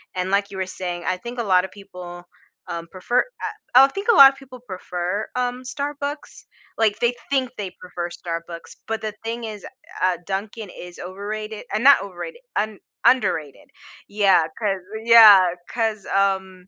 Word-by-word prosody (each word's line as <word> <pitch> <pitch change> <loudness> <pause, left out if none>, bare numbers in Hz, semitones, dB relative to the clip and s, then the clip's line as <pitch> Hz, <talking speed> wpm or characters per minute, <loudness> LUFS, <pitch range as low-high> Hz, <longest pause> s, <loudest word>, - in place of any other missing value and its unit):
and 185 +1 -2
like 200 0 +1
you 195 - -9
were 190 - -1
saying, 180 -2 -5
I 185 - 0
think 240 +6 -8
a - - 0
lotta 185 -3 +3
people, 180 -3 -11 0.4
um, 170 0 -5
prefer 215 +7 0 0.6
uh, 260 - +10
I - - +6
think 395 - -6
a - - +3
lot 275 -2 +10
of 270 - -18
people 255 -2 -13
prefer, 185 +1 -4
um, 250 0 -2
Starbucks, 285 +2 -5 0.3
like 215 -1 +1
they 240 0 +2 0.2
think 265 -2 +1
they 195 -3 -4
prefer 175 -1 -5
Starbucks, 170 -1 -7
but 225 0 -3
the 215 -1 -4
thing 230 +1 -4
is, 215 -2 -7 0.4
uh, 185 -1 +2
Dunkin' 205 +2 -5
is 180 0 -10
overrated 210 +3 -6
uh, 215 - +1
not 275 +1 +6
overrated, 200 - -8 0.2
un 215 -1 -2 0.3
underrated. 185 - +1 0.4
Yeah, 200 -4 +4
'cause 200 -4 -1 0.2
yeah, 220 -5 +9 0.2
'cause, 220 -4 -2
um, 190 -2 -1
205 Hz, 165 wpm, -22 LUFS, 185-235 Hz, 0.6 s, uh